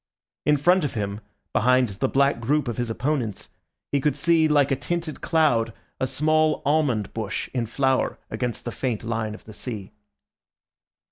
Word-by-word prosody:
In 150 0 +5
front 175 +6 +4
of 145 - -2
him, 100 0 -3 0.3
behind 125 +1 +4
the 100 +7 -1
black 140 -2 +3
group 140 +5 +1
of 120 - -3
his 120 -1 -1
opponents, 125 -3 -2 0.4
he 140 - +2
could 150 +1 +1
see, 165 -2 +3
like 145 -2 +3
a - - +4
tinted 170 +2 -3
cloud, 120 -9 +2 0.3
a 130 - +1
small 155 +2 +2
almond 135 -9 +1
bush 110 -3 -3
in 120 -3 -1
flower 130 +2 +1
against 125 -2 -3
the 120 - -3
faint 120 -4 -2
line 110 -2 -2
of - - -15
the 110 - -11
sea. 105 -4 -6
130 Hz, 165 wpm, -24 LUFS, 115-150 Hz, 0.4 s, In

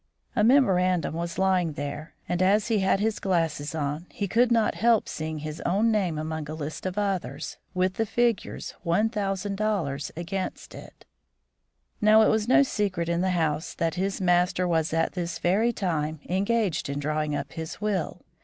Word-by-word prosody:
A 210 - +3
memorandum 185 - +3
was 170 +1 -4
lying 185 -4 +2
there, 145 +2 -6
and 175 +1 -1
as 205 +5 +3
he 220 -2 +2
had 190 0 +2
his 220 +1 0
glasses 165 -5 -1
on, 150 +3 -3
he 200 - -3
could 240 +5 +3
not 225 -2 +3
help 230 0 +3
seeing 155 0 -4
his 155 +1 -6
own 210 +5 +2
name 190 -7 0
among 155 -1 -4
a 155 - -4
list 155 +4 -5
of 185 +2 -5
others, 200 -3 -2 0.2
with 185 0 +1
the 225 -1 0
figures 235 -2 -1
$1000 195 -4 -1
against 185 +3 -4
it. - - -12 1.0
Now, 215 +1 +6
it - - +4
was 220 0 +1
no 260 +3 +6
secret 195 -9 -1
in 170 0 +1
the 190 - +1
house 160 -2 -1
that 165 -1 0
his 190 +2 -2
master 180 0 +2
was 160 -2 +1
at 165 0 +1
this 175 -2 -3
very 210 +7 +2
time 160 -7 -2
engaged 200 -3 0
in 140 - -3
drawing 150 +1 -1
up - - -4
his 160 +1 -6
will. 205 -5 -2
180 Hz, 175 wpm, -26 LUFS, 160-210 Hz, 1.0 s, Now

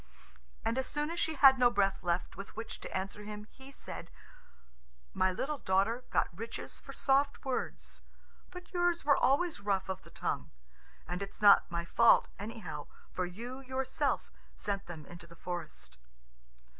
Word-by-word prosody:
And 230 +3 +1
as 265 - -1
soon 295 +2 -2
as 340 - -3
she 320 -1 +1
had 270 -2 +8
no 245 -1 +7
breath 195 -4 +1
left 175 0 -1
with 195 - -8
which 225 +1 -6
to - - -4
answer 195 +2 -5
him, 210 0 -7
he 265 +1 -13
said, - - -7 1.0
"My 185 0 +3
little 280 +10 -2
daughter 200 +6 +1
got - - +1
riches 230 +4 -6
for - - -10
soft 280 +1 +2
words, 260 -1 -3 0.5
but 360 +1 -11
yours 350 -2 +1
were 285 -1 +6
always 325 +5 +2
rough 195 -2 0
of 190 0 -3
the - - -15
tongue. - - -2 0.6
And 180 +2 -3
it's 200 - -6
not 205 -1 +7
my 170 0 -2
fault, 235 +6 +5
anyhow, 210 -7 -6 0.2
for 180 -1 -1
you 240 +8 -7
yourself 260 0 -1 0.2
sent 200 -1 -3
them 160 -4 -8
into 175 +1 -11
the 170 - -14
forest." 170 - -7
220 Hz, 165 wpm, -33 LUFS, 190-270 Hz, 1.0 s, had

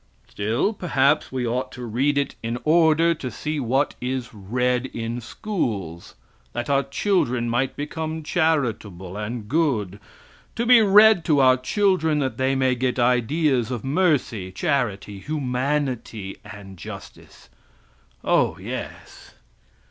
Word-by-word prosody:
Still, 110 - -1
perhaps, 150 -6 +1
we 130 -2 -2
ought 125 +2 -2
to 125 -1 -7
read 135 +6 0
it 140 -1 0
in 115 +1 -3
order 165 +1 +4
to 135 -5 -6
see 150 +6 -4
what 135 +3 +1
is 125 -1 -3
read 125 +5 -1
in 115 0 -5
schools 110 - -4 0.4
that 120 +3 -3
our 140 0 +4
children 135 - 0
might 120 +3 0
become 160 +2 -4
charitable 120 - -1
and 105 +1 -5
good; 115 - 0 0.6
to 235 - -1
be 245 -1 +7
read 210 -2 +6
to 150 -3 +3
our 130 -1 +6
children 160 +3 +1
that 135 -3 -1
they 130 +1 +1
may 130 -1 +2
get 125 0 -1
ideas 125 +1 +2
of 120 -4 -4
mercy, 135 - 0
charity 105 - -2
humanity 130 -5 -2
and 100 -2 -11
justice! - - -11 0.7
Oh, - - +2
yes! - - -8
130 Hz, 130 wpm, -23 LUFS, 115-155 Hz, 0.7 s, be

